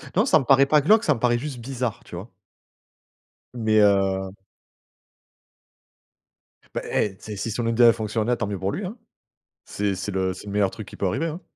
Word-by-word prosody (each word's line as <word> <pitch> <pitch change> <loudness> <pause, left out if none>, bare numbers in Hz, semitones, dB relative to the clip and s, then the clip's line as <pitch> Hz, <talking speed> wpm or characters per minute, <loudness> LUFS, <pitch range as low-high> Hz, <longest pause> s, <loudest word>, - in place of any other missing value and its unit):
Non 210 - +3
ça 160 - +4
me - - -3
paraît 135 +1 +5
pas 150 +1 +3
glauque, 215 +9 +4
ça - - +3
me - - -6
paraît 120 0 +2
juste 140 -3 -6
bizarre, 125 -2 -4
tu - - -10
vois? 95 +7 -9 1.2
Mais, 110 -2 +2
heu 95 -1 +2 2.4
Bah, - - -2
eh, 95 -3 -1
c'est 105 - -8
si 110 +3 -4
son 115 +2 -2
idée 115 +1 +3
a 115 - +8
fonctionné, 110 +1 -1
tant 110 - -2
mieux 100 -1 -4
pour 95 +1 -1
lui, 200 - -4
hein. 205 +7 -7 0.7
C'est 100 -1 -2
c'est 95 +2 -5
le 95 -1 -1
c'est 95 - -12
le 100 - -7
meilleur 100 -2 +2
truc 110 - -9
qui - - -11
peut 100 - -1
arriver, 125 - -1
hein. 165 +3 -6
110 Hz, 205 wpm, -24 LUFS, 100-130 Hz, 2.4 s, a